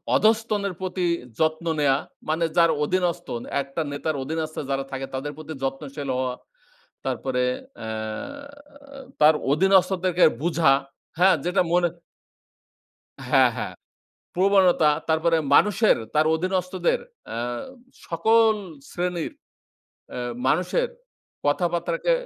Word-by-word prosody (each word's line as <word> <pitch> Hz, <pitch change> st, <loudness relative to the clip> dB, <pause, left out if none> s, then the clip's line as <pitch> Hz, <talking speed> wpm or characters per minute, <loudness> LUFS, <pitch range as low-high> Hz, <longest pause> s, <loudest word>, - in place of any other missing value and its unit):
অধস্তন 220 Hz, -1 st, +2 dB, 0.2 s
প্রতি 185 Hz, -1 st, -2 dB, 0.3 s
যত্ন 160 Hz, +1 st, +1 dB
নেয়া 135 Hz, -2 st, +3 dB, 0.3 s
মানে 165 Hz, +1 st, +1 dB
যার 170 Hz, -1 st, +6 dB
অধীনস্তন। 175 Hz, -7 st, -1 dB, 0.2 s
একটা 140 Hz, +4 st, -4 dB
নেতার 145 Hz, +2 st, -2 dB
অধীনস্থ 155 Hz, +2 st, -4 dB
যারা 135 Hz, 0 st, 0 dB
থাকে 135 Hz, 0 st, -4 dB
তাদের 140 Hz, +3 st, -3 dB
প্রতি 155 Hz, 0 st, -7 dB
যত্নশীল 135 Hz, +1 st, -4 dB
হওয়া। 125 Hz, -1 st, -1 dB, 0.7 s
তারপরে 125 Hz, -1 st, -1 dB, 0.4 s
অ্যাঁ 110 Hz, -, -6 dB, 0.7 s
তার 155 Hz, +1 st, +6 dB, 0.2 s
অধীনস্থদেরকে 185 Hz, +1 st, +3 dB, 0.2 s
বুঝা। 165 Hz, -4 st, +3 dB, 0.5 s
হ্যাঁ? 185 Hz, 0 st, +6 dB
যেটা 180 Hz, -, +2 dB
মনে 175 Hz, -1 st, +3 dB, 1.4 s
হ্যাঁ, -, -, +5 dB
হ্যাঁ। -, -, -4 dB, 0.6 s
প্রবণতা 185 Hz, -4 st, +4 dB, 0.2 s
তারপরে 160 Hz, +1 st, +2 dB, 0.2 s
মানুষের, 210 Hz, +1 st, +5 dB, 0.2 s
তার 155 Hz, +1 st, +4 dB
অধীনস্থদের 185 Hz, +1 st, 0 dB, 0.3 s
অ্যা 115 Hz, -, -4 dB, 0.7 s
সকল 220 Hz, +6 st, +4 dB, 0.4 s
শ্রেণীর 175 Hz, -2 st, -2 dB, 0.8 s
এ -, -, -3 dB, 0.3 s
মানুষের 185 Hz, -, +1 dB, 0.6 s
কথাবার্তাকে 175 Hz, -, 0 dB
170 Hz, 100 wpm, -24 LUFS, 145-185 Hz, 1.4 s, যার